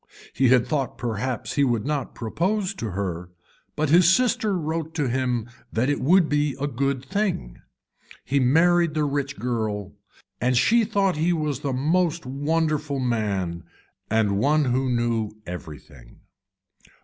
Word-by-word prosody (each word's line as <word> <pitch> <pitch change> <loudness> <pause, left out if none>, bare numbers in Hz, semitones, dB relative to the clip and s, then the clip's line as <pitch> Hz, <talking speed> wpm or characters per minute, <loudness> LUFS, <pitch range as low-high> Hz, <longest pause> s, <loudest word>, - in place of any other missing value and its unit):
He 130 +2 +3
had 125 -1 +4
thought 140 -4 -2
perhaps 120 +1 -3
he 145 - +2
would 120 -4 +1
not 145 -3 -2
propose 185 - -1
to 115 - -5
her 90 -2 -4 0.5
but 155 -1 0
his 175 +1 +6
sister 215 -3 +2
wrote 160 0 -3
to 150 -4 0
him 125 -2 -1 0.2
that 125 +5 +1
it 145 - -1
would 175 +4 +4
be 145 -2 0
a 140 - -1
good 135 0 -2
thing. 180 - -2 0.6
He 140 +1 +1
married 165 +5 +3
the 155 - +1
rich 145 0 -2
girl 110 -5 -3 0.5
and 125 0 +2
she 230 - +4
thought 200 -5 +1
he 170 +3 +2
was 150 -5 -2
the 145 -2 -2
most 165 +5 0
wonderful 150 +1 -1
man 100 -9 -1 0.5
and 105 -2 +2
one 150 +5 +3
who 130 +1 0
knew 115 -3 0
everything. 75 -7 -10
140 Hz, 150 wpm, -24 LUFS, 115-160 Hz, 0.6 s, his